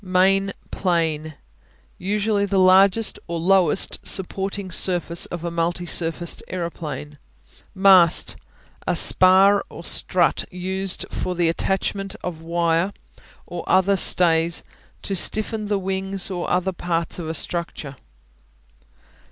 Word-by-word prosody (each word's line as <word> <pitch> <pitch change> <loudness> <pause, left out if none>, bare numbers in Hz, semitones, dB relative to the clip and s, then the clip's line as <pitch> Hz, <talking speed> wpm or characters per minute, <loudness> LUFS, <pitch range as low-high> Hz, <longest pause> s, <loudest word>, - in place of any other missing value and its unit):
Main 195 +1 +2 0.2
Plane 160 -4 -2 0.6
Usually 205 +1 -1
the 195 0 -1
largest 190 +3 +3
or 170 0 -4
lowest 185 0 +3
supporting 190 0 -4
surface 175 -1 0
of 175 -1 -7
a 170 - -3
multi 170 +1 -2
surfaced 170 0 0
aeroplane. 160 -4 -6 0.6
Mast 190 -3 +4 0.5
A - - +1
spar 190 +2 +6
or - - -11
strut - - +1
used 190 +1 -3
for 180 - -4
the 170 -1 +1
attachment 195 +3 -3
of 170 -3 -6
wire 170 +3 0 0.5
or 175 -1 -7
other 190 +1 +3
stays 170 -3 +3 0.4
to 195 - -3
stiffen 215 +3 0
the 205 -1 0
wings 195 0 -3
or 175 -2 -4
other 185 +1 0
parts 170 -1 -3
of 160 -2 -5
a 160 - -4
structure. 160 -4 -5
185 Hz, 120 wpm, -21 LUFS, 170-195 Hz, 0.6 s, spar